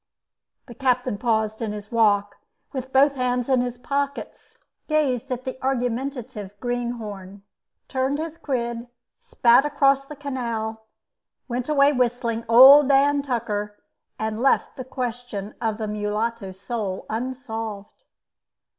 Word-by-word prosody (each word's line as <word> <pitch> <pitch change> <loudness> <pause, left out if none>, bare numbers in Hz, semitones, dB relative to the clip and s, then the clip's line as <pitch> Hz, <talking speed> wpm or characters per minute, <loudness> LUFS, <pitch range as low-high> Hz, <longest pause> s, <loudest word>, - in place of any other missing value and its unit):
The 240 - -11
captain 250 -3 0
paused 220 -2 0
in 215 -2 -2
his 210 0 -9
walk, 205 -3 +2 0.4
with 260 -1 -5
both 275 +2 +5
hands 250 -2 -1
in 260 -2 +4
his 245 0 -3
pockets, 280 +2 -4 0.3
gazed 275 -4 0
at 250 0 -3
the 260 0 -6
argumentative 245 -5 -3
greenhorn, 220 -6 -5 0.4
turned 265 +2 -1
his 325 +1 -5
quid, 235 -3 -3 0.3
spat 275 - +4
across 275 -2 +2
the 300 - -8
canal, 230 -6 -4 0.6
went 250 +2 -3
away 285 -1 +5
whistling 240 -2 0
"Old 270 +4 +9
Dan 285 +1 +4
Tucker," 215 -6 -3 0.4
and 220 +1 -3
left 270 - +2
the 255 - -6
question 245 -5 -5
of 220 -2 -1
the 220 -1 -3
mulatto's 210 -1 -3
soul 200 -4 -4
unsolved. 225 - -5
245 Hz, 125 wpm, -24 LUFS, 220-270 Hz, 0.6 s, Old